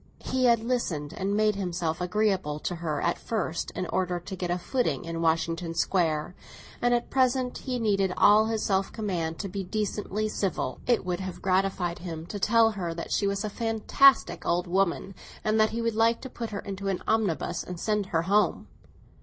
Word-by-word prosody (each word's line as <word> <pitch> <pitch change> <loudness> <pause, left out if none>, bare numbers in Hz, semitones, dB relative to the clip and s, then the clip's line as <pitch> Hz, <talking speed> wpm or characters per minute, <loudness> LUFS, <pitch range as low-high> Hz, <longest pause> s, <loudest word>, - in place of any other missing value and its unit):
He 260 0 +1
had 235 -2 +4
listened 185 - -2
and 200 +2 -1
made 215 0 +3
himself 175 -4 -2
agreeable 190 -5 0
to 175 - -3
her 155 -3 -2
at 170 - 0
first, 185 -7 -2
in 185 - -2
order 180 -1 0
to 190 +3 -7
get 180 -1 -4
a 175 - +1
footing 175 - -1
in 165 0 -4
Washington 165 +1 0
Square; 165 -2 +1 0.5
and 245 - +3
at 240 0 0
present 255 -1 +1
he 255 -2 -3
needed 200 -5 +1
all 215 +2 +6
his 220 -1 -1
self 195 -1 +1
command 175 -7 -2
to 200 - -4
be 195 +1 -4
decently 210 +2 -2
civil. 190 -11 -2
It 240 -5 +2
would 180 -1 -1
have 185 -2 -5
gratified 185 -2 0
him 165 -2 -6
to 205 - -4
tell 225 +2 +4
her 175 -5 -4
that 170 - -6
she 200 - +2
was 200 +1 -1
a 215 - -2
fantastic 230 +5 +3
old 175 +1 +1
woman, 190 +1 0 0.3
and 215 +1 +2
that 215 0 +5
he 230 +1 -3
should 230 -1 0
like 225 +1 +3
to 260 - -8
put 230 -2 -5
her 200 - -4
into 200 -1 -5
an 190 -2 -1
omnibus 190 -5 0
and 180 -2 -7
send 210 -1 0
her 165 -3 0
home. 205 +4 +2
195 Hz, 195 wpm, -27 LUFS, 175-220 Hz, 0.5 s, all